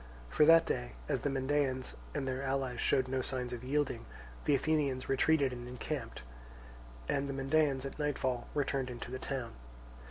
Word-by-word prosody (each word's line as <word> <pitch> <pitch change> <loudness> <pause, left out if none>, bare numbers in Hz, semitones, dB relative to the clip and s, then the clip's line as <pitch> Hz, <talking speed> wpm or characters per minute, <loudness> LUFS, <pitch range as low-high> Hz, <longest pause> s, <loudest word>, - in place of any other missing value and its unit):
For 150 - +5
that 165 +1 +8
day, - - -2
as - - 0
the 145 - 0
Mendaeans 135 -1 0 0.2
and 140 -2 -1
their 130 0 -2
allies 135 -3 -1
showed 130 -1 +3
no 130 0 0
signs 125 -1 -1
of 120 0 -6
yielding, 140 - -1 0.4
the 145 - +4
Athenians 140 -3 +1
retreated 135 0 +3
and 120 0 -7
encamped, 125 - -5 0.8
and 140 0 0
the - - -2
Mendaeans 135 0 +2
at 135 - -6
nightfall 130 -4 -1
returned 135 -2 0
into 120 0 -6
the 130 - -4
town. 130 -3 -3
135 Hz, 165 wpm, -33 LUFS, 125-145 Hz, 0.8 s, that